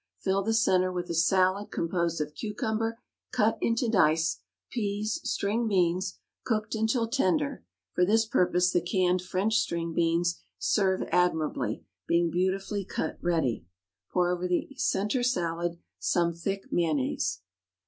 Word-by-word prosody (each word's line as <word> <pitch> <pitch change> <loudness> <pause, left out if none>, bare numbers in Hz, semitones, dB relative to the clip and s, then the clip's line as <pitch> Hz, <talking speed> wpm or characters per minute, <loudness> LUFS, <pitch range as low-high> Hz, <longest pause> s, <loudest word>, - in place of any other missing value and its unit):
Fill 195 0 0
the 220 +3 -1
centre 185 -5 +3
with 175 -1 -4
a - - -1
salad 185 +4 +2
composed 170 -1 -1
of 150 0 -3
cucumber 220 +4 -2 0.3
cut 225 -2 +2
into 230 +1 +1
dice, 165 - +3 0.3
peas, 210 -1 -2
string 220 +4 0
beans 185 -2 +1 0.3
cooked 215 -3 -1
until 225 +1 +1
tender 275 +3 0 0.3
(for 180 - +2
this 220 +4 +3
purpose 180 -4 +2
the 175 - +2
canned 180 0 +1
French 190 +5 0
string 170 -6 -1
beans 170 +1 +1 0.2
serve 190 -3 +1
admirably, 160 -4 +1 0.2
being 170 0 +2
beautifully 195 +3 -1
cut 160 - -4
ready). 160 - 0 0.4
Pour 180 -1 +2
over 180 0 -1
the 180 -1 0
centre 240 -1 0
salad 175 -7 -1 0.2
some 170 -1 +1
thick 195 +4 -3
mayonnaise. 130 - 0
185 Hz, 135 wpm, -28 LUFS, 170-215 Hz, 0.4 s, centre